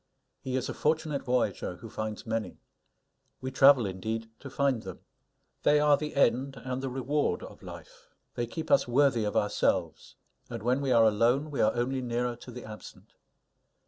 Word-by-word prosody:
He 130 -1 -4
is 130 -1 -1
a - - -4
fortunate 155 -2 0
voyager 125 -8 -1
who 115 - -11
finds 110 0 -5
many. 110 -1 -3 0.8
We 130 0 -5
travel, 135 -2 +6
indeed, 110 +4 -4
to 140 - -9
find 135 -3 0
them. 95 -3 -9 0.6
They 150 0 +4
are 150 -1 +5
the 150 +1 -5
end 135 0 +2
and 130 0 -3
the 135 - -3
reward 135 +3 -1
of - - -11
life. - - -12 0.2
They 120 - -2
keep 160 +7 -6
us - - +4
worthy 125 -3 +3
of 105 - -1
ourselves; 105 0 0 0.3
and 115 -3 -6
when 125 +4 +1
we 135 -2 0
are 115 -2 +6
alone, 120 +8 +2
we 140 - -1
are - - +3
only 130 +2 -1
nearer 120 0 -2
to 125 - -12
the 125 0 -9
absent. 110 0 -12
125 Hz, 175 wpm, -29 LUFS, 115-140 Hz, 0.8 s, travel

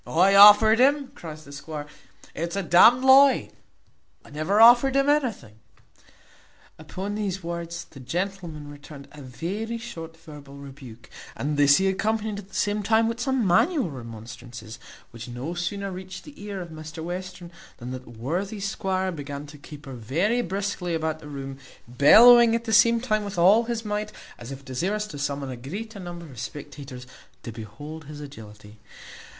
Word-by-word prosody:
"I 185 +4 +3
offered 210 +3 +8
him!" 280 +1 +3
cries 155 - -10
the 140 - -13
squire; 145 +1 -7 0.5
"it 170 +2 -3
is 170 - -6
a 200 - -2
d 175 - -3
n'd 245 +8 +7
lie! 270 +1 +6 0.7
I - - -16
never 155 +8 0
offered 240 +4 +7
him 275 0 +2
anything." 240 - -1 1.2
Upon 185 +6 -6
these 195 -3 -3
words 170 0 -5
the 135 - -15
gentleman 170 +1 -5
returned 145 -1 -12
a 150 - -12
very 195 - -5
short 165 -9 -9
verbal 150 -4 -13
rebuke, 135 -4 -12 0.3
and 150 +2 -2
this 145 0 +5
he 190 - +1
accompanied 215 +2 -1
at 195 - -12
the - - -14
same 210 0 0
time 220 +2 +2
with 230 +1 -3
some 260 -2 0
manual 200 - +2
remonstrances, 115 -1 -10 0.3
which 115 0 -9
no 125 +7 -6
sooner 195 +3 -4
reached 185 0 -9
the 290 -8 -13
ears 200 -3 -5
of 165 - -13
Mr 160 +1 -8
Western, 180 0 -7 0.3
than 125 +1 -8
that 130 0 -8
worthy 180 - -3
squire 190 -1 -2
began 145 -3 -7
to 150 0 -13
caper 145 -1 -11
very 165 - 0
briskly 195 -4 -3
about 160 -1 -2
the 150 - -12
room, 135 -1 -7 0.3
bellowing 230 - +7
at 230 - -2
the 225 -1 -3
same 230 +3 +5
time 215 -4 0
with 200 -2 -7
all 200 +7 +5
his 230 -1 -4
might, 210 0 -3 0.3
as 120 +2 -9
if 135 0 -9
desirous 190 +12 -2
to 150 -9 -9
summon 140 -1 -3
a - - -5
greater 200 - -8
number 175 -2 -8
of 130 -7 -12
spectators 140 -2 -8 0.4
to 115 - -6
behold 145 +9 -9
his 150 +1 -10
agility. 105 -7 -12
170 Hz, 170 wpm, -25 LUFS, 140-210 Hz, 1.2 s, offered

